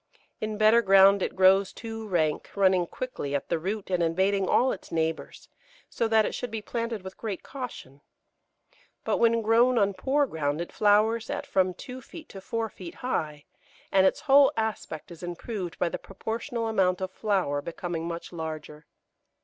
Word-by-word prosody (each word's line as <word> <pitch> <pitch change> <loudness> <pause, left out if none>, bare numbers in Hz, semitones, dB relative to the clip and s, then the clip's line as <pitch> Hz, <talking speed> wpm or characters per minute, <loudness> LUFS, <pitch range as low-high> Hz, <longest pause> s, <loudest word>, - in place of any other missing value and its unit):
In 215 0 -3
better 215 +2 +5
ground 195 -1 +6
it - - -2
grows 190 +1 +5
too 225 -1 -7
rank, 160 -6 0
running 190 -3 +3
quickly 155 - -4
at 140 - -3
the 170 - 0
root 195 +3 -4
and 180 -1 +1
invading 190 +4 +1
all 260 +1 +3
its - - -8
neighbours, 160 -1 -3 0.4
so 230 - 0
that 220 -1 +4
it - - -3
should 245 - -4
be 225 0 -4
planted 230 -1 -4
with 190 0 -10
great 210 -5 -4
caution; 245 - -8 1.0
but - - 0
when 230 -1 +3
grown 235 +3 +4
on 200 -2 +3
poor 270 +10 +1
ground 150 - -2
it 170 - -5
flowers 215 +2 +2
at - - -3
from 185 -1 +1
two 255 +5 -9
feet 320 +5 -12
to 195 - -10
four 225 +3 -2
feet 180 -5 -10
high, 150 - -2 0.5
and 190 -1 +5
its - - 0
whole 275 0 +6
aspect 220 -8 -3
is 170 - -11
improved 175 +1 -5
by 175 - +1
the - - -4
proportional 230 +4 -4
amount 190 -4 +2
of 185 -1 -4
flower 190 -10 0
becoming 170 +1 -4
much 170 +1 -6
larger. 155 -2 -7
195 Hz, 175 wpm, -27 LUFS, 170-225 Hz, 1.0 s, ground